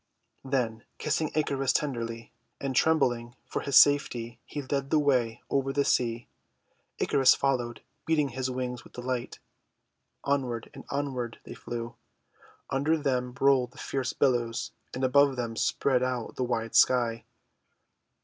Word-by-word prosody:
Then 125 Hz, -5 st, -1 dB
kissing 155 Hz, 0 st, 0 dB
Icarus 140 Hz, -3 st, +1 dB
tenderly, 115 Hz, -5 st, -2 dB, 0.3 s
and 135 Hz, -2 st, -3 dB
trembling 120 Hz, -6 st, +2 dB
for -, -, -3 dB
his 140 Hz, -, +3 dB
safety, 120 Hz, -5 st, +4 dB
he 145 Hz, -, -5 dB
led 135 Hz, +1 st, -2 dB
the 155 Hz, -, +3 dB
way 130 Hz, -6 st, +1 dB
over 135 Hz, 0 st, 0 dB
the 140 Hz, 0 st, +1 dB
sea. 120 Hz, -1 st, +1 dB, 0.7 s
Icarus 135 Hz, -2 st, +4 dB
followed, 125 Hz, -4 st, -1 dB, 0.2 s
beating 150 Hz, -3 st, +2 dB
his 130 Hz, +1 st, -3 dB
wings 125 Hz, -1 st, -4 dB
with -, -, -17 dB
delight. 125 Hz, 0 st, -4 dB, 0.9 s
Onward 130 Hz, -5 st, -1 dB
and -, -, -11 dB
onward 130 Hz, -5 st, -3 dB
they -, -, -9 dB
flew. 120 Hz, 0 st, -6 dB, 0.8 s
Under 145 Hz, +4 st, +2 dB
them 125 Hz, -4 st, -1 dB
rolled 135 Hz, -3 st, +3 dB
the -, -, -18 dB
fierce 135 Hz, -5 st, -2 dB
billows, 120 Hz, -4 st, 0 dB, 0.2 s
and 130 Hz, -, -4 dB
above 140 Hz, +1 st, +4 dB
them 120 Hz, -2 st, -3 dB
spread 130 Hz, +2 st, +1 dB
out 125 Hz, -2 st, -2 dB
the 130 Hz, -, -1 dB
wide 115 Hz, -2 st, -2 dB
sky. 115 Hz, -3 st, +4 dB
130 Hz, 140 wpm, -28 LUFS, 120-140 Hz, 0.9 s, safety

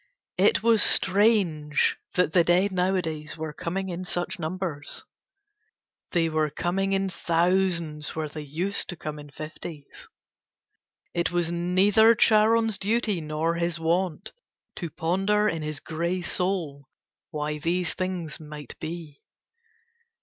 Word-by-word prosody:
It 450 Hz, -, +4 dB
was 230 Hz, -2 st, +4 dB
strange 190 Hz, -9 st, +3 dB, 0.2 s
that 180 Hz, -3 st, +2 dB
the 175 Hz, -, +5 dB
dead 180 Hz, +4 st, +3 dB
nowadays 180 Hz, -5 st, -1 dB
were 155 Hz, -1 st, -5 dB
coming 190 Hz, +5 st, -3 dB
in 180 Hz, +1 st, -4 dB
such 175 Hz, 0 st, -2 dB
numbers. 160 Hz, -3 st, -3 dB, 1.0 s
They 170 Hz, -2 st, +2 dB
were 155 Hz, -1 st, +1 dB
coming 190 Hz, +6 st, -1 dB
in 195 Hz, 0 st, +1 dB
thousands 170 Hz, -3 st, 0 dB
where 155 Hz, -1 st, -2 dB
they 155 Hz, +1 st, -7 dB
used 165 Hz, +8 st, -3 dB
to 175 Hz, -, -4 dB
come 155 Hz, -2 st, -6 dB
in 145 Hz, 0 st, -11 dB
fifties. 155 Hz, 0 st, -8 dB, 1.1 s
It 170 Hz, -1 st, +1 dB
was 175 Hz, -1 st, +1 dB
neither 190 Hz, +6 st, +4 dB
Charon's 220 Hz, 0 st, +4 dB
duty 210 Hz, -3 st, 0 dB
nor 155 Hz, +2 st, -1 dB
his 170 Hz, 0 st, -1 dB
wont 175 Hz, +3 st, -1 dB, 0.5 s
to 170 Hz, -, -4 dB
ponder 195 Hz, +7 st, +1 dB
in 165 Hz, -6 st, -1 dB
his 155 Hz, -1 st, -4 dB
grey 170 Hz, +4 st, -2 dB
soul 170 Hz, -8 st, -2 dB, 0.4 s
why 150 Hz, 0 st, -3 dB
these 175 Hz, +2 st, 0 dB
things 180 Hz, -5 st, -3 dB
might 150 Hz, -3 st, -9 dB
be. 155 Hz, -3 st, -7 dB
175 Hz, 130 wpm, -26 LUFS, 155-190 Hz, 1.1 s, the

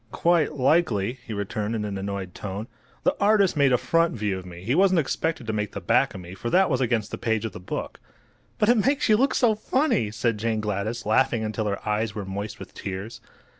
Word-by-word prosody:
"Quite 170 Hz, -3 st, +2 dB
likely," 130 Hz, -, +2 dB
he -, -, -6 dB
returned, 105 Hz, +1 st, -2 dB
in 105 Hz, -1 st, -2 dB
an 100 Hz, -1 st, -4 dB
annoyed 95 Hz, -2 st, -4 dB
tone. 100 Hz, +2 st, -5 dB, 0.4 s
"The 275 Hz, -, +2 dB
artist 200 Hz, -3 st, +4 dB
made 140 Hz, -3 st, +4 dB
a 125 Hz, -, +5 dB
front 165 Hz, +3 st, +1 dB
view 105 Hz, -4 st, -1 dB
of 90 Hz, -, -11 dB
me. 85 Hz, 0 st, -10 dB
He 115 Hz, +6 st, 0 dB
wasn't 185 Hz, +1 st, +4 dB
expected 155 Hz, -1 st, -1 dB
to 110 Hz, -, -2 dB
make 105 Hz, -1 st, -2 dB
the -, -, -4 dB
back 115 Hz, +6 st, +2 dB
of 95 Hz, -, -7 dB
me, 90 Hz, +1 st, -10 dB
for 120 Hz, +5 st, -4 dB
that 185 Hz, +4 st, +3 dB
was 130 Hz, -1 st, +1 dB
against 120 Hz, -4 st, 0 dB
the -, -, -5 dB
page 110 Hz, -2 st, 0 dB
of 110 Hz, -, -3 dB
the -, -, -9 dB
book." 90 Hz, -, -5 dB, 0.6 s
"But 210 Hz, -, +2 dB
it 235 Hz, -4 st, +4 dB
makes 275 Hz, -1 st, +1 dB
you 215 Hz, -, +7 dB
look 265 Hz, +5 st, +2 dB
so 235 Hz, -3 st, +4 dB
funny!" 215 Hz, -, +1 dB
said 115 Hz, 0 st, -1 dB
Jane 110 Hz, 0 st, 0 dB
Gladys, 105 Hz, +2 st, -3 dB
laughing 110 Hz, +1 st, +2 dB
until 110 Hz, 0 st, -2 dB
her 100 Hz, 0 st, -3 dB
eyes 105 Hz, 0 st, 0 dB
were 105 Hz, -2 st, -4 dB
moist 100 Hz, +2 st, -5 dB
with -, -, -11 dB
tears. 100 Hz, +4 st, -6 dB
115 Hz, 230 wpm, -25 LUFS, 100-155 Hz, 0.6 s, you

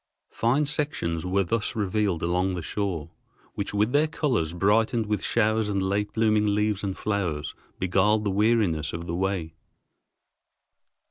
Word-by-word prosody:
Fine 130 Hz, +6 st, +1 dB
sections 140 Hz, -, -2 dB
were 100 Hz, +2 st, +2 dB
thus 105 Hz, +4 st, -1 dB
revealed 100 Hz, -4 st, 0 dB
along 90 Hz, +2 st, +1 dB
the 85 Hz, -, -5 dB
shore, 90 Hz, -5 st, -3 dB, 0.4 s
which 100 Hz, -, -3 dB
with 105 Hz, +3 st, +1 dB
their 150 Hz, +3 st, +3 dB
colors, 125 Hz, -, 0 dB
brightened 110 Hz, +6 st, +2 dB
with 105 Hz, 0 st, -2 dB
showers 110 Hz, -1 st, +1 dB
and 100 Hz, -1 st, 0 dB
late 100 Hz, +2 st, -1 dB
blooming 105 Hz, -2 st, +2 dB
leaves 105 Hz, -1 st, 0 dB
and 95 Hz, -2 st, -3 dB
flowers, 90 Hz, -8 st, -2 dB, 0.2 s
beguiled 95 Hz, +4 st, +2 dB
the 100 Hz, -, 0 dB
weariness 100 Hz, -7 st, +1 dB
of 85 Hz, +1 st, -5 dB
the 85 Hz, -, -4 dB
way. 90 Hz, -3 st, -2 dB
100 Hz, 145 wpm, -26 LUFS, 90-110 Hz, 0.4 s, their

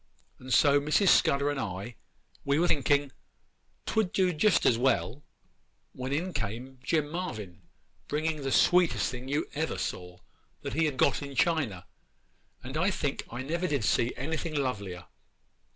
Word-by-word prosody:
And 130 Hz, +1 st, -9 dB
so 145 Hz, +2 st, +5 dB
Mrs. 155 Hz, +7 st, +3 dB
Scudder 140 Hz, +1 st, +4 dB
and 145 Hz, -, -3 dB
I, 100 Hz, +2 st, -5 dB, 0.5 s
we 140 Hz, +1 st, +1 dB
were 175 Hz, +2 st, +3 dB
thinking 145 Hz, -1 st, +2 dB, 0.7 s
'twould 215 Hz, -5 st, 0 dB
do 185 Hz, -2 st, +2 dB
just 175 Hz, +5 st, +3 dB
as 120 Hz, -, +5 dB
well, 130 Hz, +1 st, 0 dB, 0.7 s
when 130 Hz, +1 st, -5 dB
in 175 Hz, +6 st, -1 dB
came 120 Hz, +4 st, -5 dB
Jim 155 Hz, 0 st, +1 dB
Marvyn 110 Hz, -, -5 dB, 0.5 s
bringing 155 Hz, +1 st, -1 dB
the 135 Hz, -1 st, -2 dB
sweetest 175 Hz, -1 st, +3 dB
thing 125 Hz, +1 st, -7 dB
you 145 Hz, +3 st, 0 dB
ever 160 Hz, +2 st, -2 dB
saw, 90 Hz, -1 st, -5 dB, 0.5 s
that -, -, -4 dB
he 160 Hz, +4 st, +2 dB
had 145 Hz, -4 st, -2 dB
got -, -, +2 dB
in 140 Hz, -1 st, -7 dB
China, 130 Hz, -, 0 dB, 0.8 s
and 130 Hz, +4 st, -5 dB
I 185 Hz, +5 st, +2 dB
think 145 Hz, -7 st, -2 dB
I 120 Hz, +2 st, -5 dB
never 170 Hz, +6 st, -1 dB
did 140 Hz, -8 st, -1 dB
see 115 Hz, +2 st, +2 dB
anything 155 Hz, +4 st, -3 dB
lovelier. 100 Hz, -10 st, -3 dB
140 Hz, 155 wpm, -29 LUFS, 125-160 Hz, 0.8 s, so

